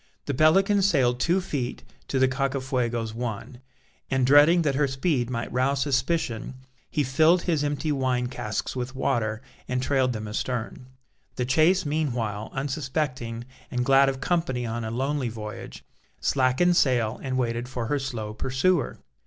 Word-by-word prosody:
The 140 Hz, -, -2 dB
Pelican 195 Hz, +8 st, +4 dB
sailed 130 Hz, -10 st, +2 dB
two 175 Hz, +7 st, +2 dB
feet 140 Hz, -9 st, -4 dB, 0.2 s
to 135 Hz, -, -1 dB
the 130 Hz, 0 st, +4 dB
Cacafuego's 130 Hz, -4 st, -1 dB
one, 120 Hz, +1 st, -5 dB, 0.5 s
and 130 Hz, -1 st, +2 dB
dreading 150 Hz, +6 st, +6 dB
that 145 Hz, -3 st, +1 dB
her 140 Hz, +1 st, +2 dB
speed 130 Hz, -2 st, 0 dB
might 115 Hz, -2 st, -3 dB
rouse 135 Hz, +2 st, +1 dB
suspicion, 135 Hz, -3 st, -1 dB, 0.3 s
he 150 Hz, -, 0 dB
filled 155 Hz, +7 st, +3 dB
his 160 Hz, -5 st, 0 dB
empty 145 Hz, +1 st, -1 dB
wine 130 Hz, -3 st, 0 dB
casks 120 Hz, -3 st, -4 dB
with 125 Hz, +1 st, -4 dB
water 110 Hz, -4 st, -1 dB, 0.2 s
and 125 Hz, -, -1 dB
trailed 130 Hz, -1 st, +1 dB
them 110 Hz, -1 st, -5 dB
astern. 120 Hz, +3 st, -4 dB, 0.5 s
The 125 Hz, -, -1 dB
chase 165 Hz, +7 st, +3 dB
meanwhile 120 Hz, -9 st, -2 dB
unsuspecting, 130 Hz, -4 st, -3 dB, 0.2 s
and 125 Hz, -1 st, -1 dB
glad 135 Hz, +1 st, +5 dB
of 135 Hz, -1 st, -4 dB
company 135 Hz, -5 st, -1 dB
on 115 Hz, 0 st, -3 dB
a 110 Hz, -, -3 dB
lonely 135 Hz, +2 st, -1 dB
voyage, 110 Hz, -1 st, -8 dB, 0.4 s
slackened 135 Hz, +7 st, +2 dB
sail 120 Hz, -5 st, +2 dB
and 130 Hz, -2 st, -2 dB
waited 120 Hz, -1 st, -1 dB
for 125 Hz, -3 st, -3 dB
her 145 Hz, +5 st, 0 dB
slow 115 Hz, -6 st, -4 dB
pursuer. 130 Hz, +6 st, 0 dB
130 Hz, 155 wpm, -26 LUFS, 120-145 Hz, 0.5 s, dreading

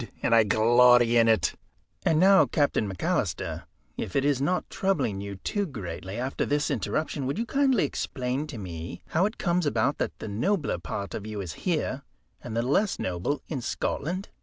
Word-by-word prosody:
And -, -, +2 dB
I 115 Hz, -1 st, +7 dB
glory 120 Hz, +2 st, +5 dB
in 115 Hz, -1 st, +5 dB
it." 110 Hz, -1 st, +3 dB, 0.5 s
"And 155 Hz, -, +3 dB
now, 195 Hz, +2 st, +6 dB
Captain 145 Hz, -, +1 dB
McAlister, 95 Hz, -, -2 dB, 0.3 s
if -, -, -5 dB
it 140 Hz, -, +2 dB
is 140 Hz, -2 st, +2 dB
not 180 Hz, +6 st, 0 dB
troubling 140 Hz, -, -1 dB
you 100 Hz, 0 st, -6 dB
too 200 Hz, -, -2 dB
greatly, 95 Hz, -, -6 dB
after 130 Hz, +3 st, -2 dB
this 145 Hz, 0 st, 0 dB
interruption 155 Hz, -3 st, -2 dB
would 140 Hz, -, -2 dB
you 230 Hz, -, -1 dB
kindly 270 Hz, -3 st, +2 dB
explain 130 Hz, +1 st, -3 dB
to 140 Hz, -, -7 dB
me 85 Hz, -4 st, -7 dB
how 180 Hz, +5 st, +2 dB
it 215 Hz, -, -8 dB
comes 175 Hz, -3 st, +1 dB
about 140 Hz, 0 st, +1 dB
that -, -, -2 dB
the -, -, -7 dB
nobler 135 Hz, -, 0 dB
part 90 Hz, +3 st, -5 dB
of 105 Hz, -, -5 dB
you 105 Hz, -1 st, -5 dB
is 90 Hz, -6 st, -5 dB, 0.2 s
here -, -, -1 dB, 0.4 s
and 115 Hz, -2 st, -5 dB
the 115 Hz, -, +1 dB
less 180 Hz, -, +1 dB
noble 90 Hz, +11 st, -2 dB
in 140 Hz, -6 st, -3 dB
Scotland?" 170 Hz, +8 st, -3 dB
130 Hz, 185 wpm, -27 LUFS, 105-160 Hz, 0.5 s, I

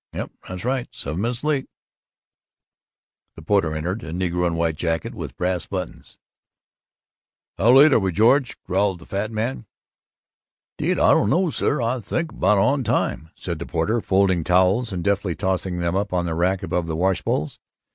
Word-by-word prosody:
"Yuh, -, -, -4 dB, 0.2 s
that's 90 Hz, +3 st, -6 dB
right; 130 Hz, -1 st, -1 dB
seven 80 Hz, -5 st, -4 dB
minutes 120 Hz, +3 st, -2 dB
late." 150 Hz, -3 st, 0 dB, 1.7 s
The 80 Hz, -, -11 dB
porter 85 Hz, -3 st, +1 dB
entered 90 Hz, +8 st, -3 dB
a 80 Hz, -, -7 dB
negro 90 Hz, 0 st, 0 dB
in 85 Hz, -, -1 dB
white 85 Hz, -1 st, 0 dB
jacket 80 Hz, 0 st, -2 dB
with -, -, -7 dB
brass 90 Hz, -1 st, -1 dB
buttons. 90 Hz, -2 st, -6 dB, 1.4 s
"How 115 Hz, +5 st, +5 dB
late 140 Hz, +2 st, +7 dB
are -, -, +5 dB
we, 95 Hz, -2 st, 0 dB
George?" 120 Hz, -, +3 dB
growled 95 Hz, 0 st, 0 dB
the 80 Hz, -, -15 dB
fat 100 Hz, +2 st, -3 dB
man. 115 Hz, +1 st, -3 dB, 1.1 s
"'Deed, -, -, +1 dB
I -, -, +5 dB
don't 100 Hz, -, +3 dB
know, 175 Hz, +4 st, +2 dB
sir. 140 Hz, -3 st, 0 dB
I 120 Hz, +3 st, 0 dB
think 165 Hz, +8 st, -3 dB
we're -, -, -14 dB
about 100 Hz, +3 st, +4 dB
on 135 Hz, +8 st, +2 dB
time," 80 Hz, -8 st, -1 dB
said 85 Hz, -3 st, -5 dB
the 85 Hz, -, -6 dB
porter, 105 Hz, +8 st, 0 dB
folding 95 Hz, -4 st, +2 dB
towels 95 Hz, +7 st, +2 dB
and 90 Hz, -2 st, -3 dB
deftly 100 Hz, -3 st, 0 dB
tossing 95 Hz, -2 st, -2 dB
them 85 Hz, 0 st, -1 dB
up 100 Hz, 0 st, -1 dB
on 90 Hz, -1 st, 0 dB
the 85 Hz, -, -2 dB
rack 90 Hz, +3 st, 0 dB
above 85 Hz, -2 st, -1 dB
the 80 Hz, -, -2 dB
washbowls. 85 Hz, -4 st, -1 dB
95 Hz, 175 wpm, -22 LUFS, 85-115 Hz, 1.7 s, late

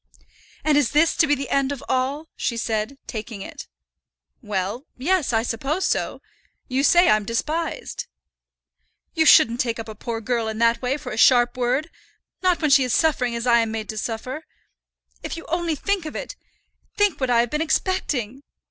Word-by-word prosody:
"And 300 Hz, -2 st, +4 dB
is 280 Hz, -, 0 dB
this 315 Hz, +3 st, +4 dB
to 320 Hz, -, +4 dB
be 290 Hz, -, +3 dB
the 275 Hz, 0 st, -6 dB
end 275 Hz, 0 st, +1 dB
of 280 Hz, -, -6 dB
all?" 270 Hz, +5 st, -1 dB
she 235 Hz, -, -2 dB
said, 225 Hz, +3 st, -2 dB
taking 220 Hz, -3 st, -6 dB
it. -, -, -9 dB, 0.7 s
"Well, 210 Hz, +4 st, -3 dB
yes; 325 Hz, +2 st, +1 dB
I 225 Hz, -1 st, +1 dB
suppose 275 Hz, +10 st, -2 dB
so. -, -, -1 dB, 0.4 s
You 260 Hz, +1 st, 0 dB
say 350 Hz, +4 st, +5 dB
I'm 215 Hz, 0 st, +4 dB
despised." 320 Hz, -, -3 dB, 1.1 s
"You 320 Hz, -2 st, +2 dB
shouldn't 235 Hz, -3 st, +6 dB
take 235 Hz, -3 st, 0 dB
up 225 Hz, -, -6 dB
a 220 Hz, -, -7 dB
poor 225 Hz, +2 st, -5 dB
girl 230 Hz, 0 st, -1 dB
in 220 Hz, 0 st, -4 dB
that 230 Hz, 0 st, +2 dB
way 260 Hz, +2 st, 0 dB
for 255 Hz, -3 st, -8 dB
a 215 Hz, -, -5 dB
sharp 240 Hz, +1 st, +5 dB
word, 255 Hz, +6 st, -1 dB, 0.5 s
not 365 Hz, -2 st, +2 dB
when 300 Hz, -, +2 dB
she 270 Hz, -, +6 dB
is 250 Hz, -2 st, 0 dB
suffering 255 Hz, -7 st, +1 dB
as 235 Hz, +1 st, -3 dB
I 235 Hz, -1 st, +5 dB
am 225 Hz, -1 st, 0 dB
made 220 Hz, -1 st, -5 dB
to 215 Hz, -, -5 dB
suffer. 250 Hz, +7 st, -4 dB, 0.8 s
If -, -, -5 dB
you 330 Hz, -, -9 dB
only 340 Hz, -1 st, 0 dB
think 385 Hz, +2 st, -1 dB
of 310 Hz, -, -8 dB
it, -, -, -5 dB, 0.6 s
think 410 Hz, -4 st, +2 dB
what 260 Hz, -, 0 dB
I 235 Hz, -1 st, +4 dB
have 240 Hz, -, -2 dB
been 300 Hz, -, -1 dB
expecting!" 280 Hz, -, -1 dB
255 Hz, 190 wpm, -23 LUFS, 230-310 Hz, 1.1 s, shouldn't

